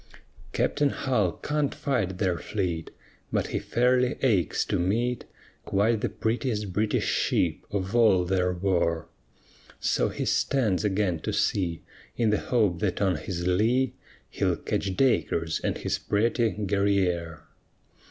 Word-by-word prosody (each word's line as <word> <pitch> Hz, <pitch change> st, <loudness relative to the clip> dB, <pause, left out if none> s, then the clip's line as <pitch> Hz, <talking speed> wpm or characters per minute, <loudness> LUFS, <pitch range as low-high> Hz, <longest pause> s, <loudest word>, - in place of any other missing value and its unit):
Captain 145 Hz, -1 st, +1 dB
Hull 110 Hz, -11 st, 0 dB
can't 150 Hz, -1 st, -2 dB
fight 110 Hz, -10 st, -1 dB
their 90 Hz, -3 st, 0 dB
fleet, 90 Hz, -6 st, -3 dB, 0.4 s
But -, -, 0 dB
he -, -, -1 dB
fairly 125 Hz, +1 st, +2 dB
aches 100 Hz, -, +2 dB
to -, -, -1 dB
meet 115 Hz, +7 st, 0 dB, 0.4 s
Quite 105 Hz, +2 st, +1 dB
the 120 Hz, -, 0 dB
prettiest 110 Hz, -4 st, -2 dB
British 105 Hz, +2 st, +1 dB
ship -, -, +1 dB
of 100 Hz, +2 st, -3 dB
all 105 Hz, -7 st, +5 dB
there 90 Hz, 0 st, +1 dB
were; 85 Hz, -3 st, 0 dB, 0.7 s
So -, -, +1 dB
he -, -, -3 dB
stands 110 Hz, -9 st, +1 dB
again 95 Hz, -4 st, 0 dB
to -, -, -3 dB
sea 85 Hz, -4 st, 0 dB, 0.3 s
In 115 Hz, -3 st, +2 dB
the 105 Hz, -, +2 dB
hope 105 Hz, -9 st, +1 dB
that 95 Hz, -2 st, -1 dB
on 95 Hz, -3 st, +2 dB
his 85 Hz, +2 st, -4 dB
lee 115 Hz, +8 st, +2 dB, 0.3 s
He'll -, -, 0 dB
catch 95 Hz, -2 st, -3 dB
Dacres 85 Hz, -11 st, +1 dB
and -, -, -2 dB
his -, -, -2 dB
pretty 115 Hz, +2 st, +1 dB
Guerrière. 95 Hz, -5 st, 0 dB
100 Hz, 135 wpm, -27 LUFS, 90-115 Hz, 0.7 s, all